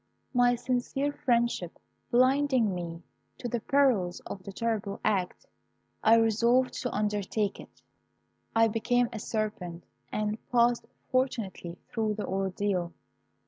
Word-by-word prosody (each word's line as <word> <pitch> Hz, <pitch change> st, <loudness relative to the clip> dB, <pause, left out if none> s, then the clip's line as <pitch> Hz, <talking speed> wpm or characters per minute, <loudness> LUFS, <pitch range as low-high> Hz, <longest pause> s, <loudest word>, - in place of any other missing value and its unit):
My 245 Hz, -1 st, +4 dB
sincere 255 Hz, +3 st, -1 dB
friendship 235 Hz, -, 0 dB, 0.3 s
blinding 255 Hz, -3 st, +3 dB
me 170 Hz, -1 st, -5 dB, 0.3 s
to 245 Hz, -, -4 dB
the 240 Hz, 0 st, -1 dB
perils 230 Hz, -10 st, +2 dB
of 195 Hz, -, -7 dB
"the 195 Hz, -, -8 dB
Terrible 210 Hz, -1 st, -2 dB
Act," 200 Hz, -, 0 dB, 0.6 s
I 225 Hz, 0 st, +7 dB
resolved 230 Hz, +3 st, +3 dB
to 250 Hz, -, -2 dB
undertake 210 Hz, 0 st, -1 dB
it. -, -, -14 dB, 0.7 s
"I 225 Hz, 0 st, +6 dB
became 235 Hz, +2 st, +1 dB
a 220 Hz, -, -4 dB
serpent, 210 Hz, -6 st, -3 dB, 0.3 s
and 210 Hz, +1 st, -1 dB
passed 240 Hz, -1 st, +3 dB, 0.2 s
fortunately 225 Hz, -9 st, -1 dB
through 215 Hz, -2 st, -1 dB
the 210 Hz, -, -3 dB
ordeal. 190 Hz, -2 st, -1 dB
225 Hz, 120 wpm, -29 LUFS, 200-245 Hz, 0.7 s, I